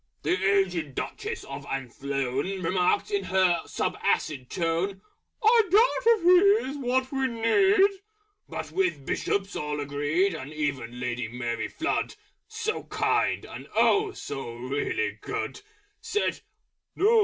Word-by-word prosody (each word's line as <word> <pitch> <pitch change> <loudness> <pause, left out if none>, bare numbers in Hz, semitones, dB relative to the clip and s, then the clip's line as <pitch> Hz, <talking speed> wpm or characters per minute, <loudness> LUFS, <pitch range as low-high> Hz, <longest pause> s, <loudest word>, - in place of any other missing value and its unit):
The - - 0 0.3
Aged 170 -8 -4
Duchess - - -4
of - - -7
Athlone 135 +6 -3
Remarked, 180 - +1
in 405 -1 0
her 185 -3 +3
sub - - -2
acid 135 -5 0
tone, 175 +3 -1 0.4
"I 455 +2 +7
doubt 465 +3 +5
if 380 - -11
He 365 - +5
is 290 - -6
what 260 0 0
we 270 -1 +1
need!" 385 - +3 0.5
With - - -6
which 380 -1 +2
the - - -19
Bishops 195 +8 -2
all 150 0 -3
agreed; 145 +6 0
And 145 -3 -7
even 140 -6 -3
Lady 120 -2 -2
Mary 120 -1 -3
Flood 320 - -2 0.3
(So 440 0 -3
Kind, - - 0
and - - -9
oh! 410 0 +4
so 135 - -6
really 140 - -2
good) - - -4 0.4
Said, 420 - -1 0.6
"No! 445 +3 +5
185 Hz, 135 wpm, -27 LUFS, -, 0.6 s, I